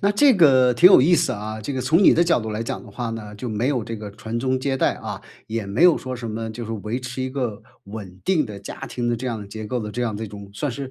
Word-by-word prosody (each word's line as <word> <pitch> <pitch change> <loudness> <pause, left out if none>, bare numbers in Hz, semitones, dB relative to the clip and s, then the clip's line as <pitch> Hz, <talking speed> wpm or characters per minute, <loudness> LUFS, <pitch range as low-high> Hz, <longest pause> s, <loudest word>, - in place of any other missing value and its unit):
那 200 - +4
这 265 +5 +5
个 130 -8 +5
挺 180 +8 +8
有 - - +8
意 165 +7 +5
思 140 - +2
啊。 110 0 -5
这 110 +7 -4
个 130 - -2
从 155 +9 +3
你 - - +8
的 170 - +4
角 170 -7 +2
度 110 - -5
来 110 +1 -2
讲 - - -4
的 - - -12
话 120 -2 -4
呢， 105 -2 -7
就 120 +4 -6
没 110 +4 -1
有 130 -5 0
这 115 -1 -5
个 105 -1 -7
传 110 +3 -5
宗 130 +1 0
接 135 +1 -1
代， - - +2
啊， - - -7 0.2
也 110 -1 -3
没 100 +9 0
有 175 -2 +7
说 130 0 -5
什 120 -2 -5
么， 110 +1 -4
就 115 +2 -6
是 115 - -5
维 110 +3 -4
持 125 +1 -5
一 130 - -3
个 120 -6 -3 0.2
稳 100 -3 -9
定 180 -5 +2
的 105 -4 -8
家 - - -9
庭 120 -1 -3
的 120 - +1
这 125 +3 -5
样 115 -4 -3
的 100 - -8
结 110 +2 -7
构 120 +3 -2
的 105 -1 -5
这 125 - -3
样 115 -3 -1
的 110 +2 -4
一 - - -7
种 100 -1 -10
算 140 +8 -2
是 135 +2 -6
120 Hz, 335 characters per minute, -22 LUFS, 110-130 Hz, 0.2 s, 挺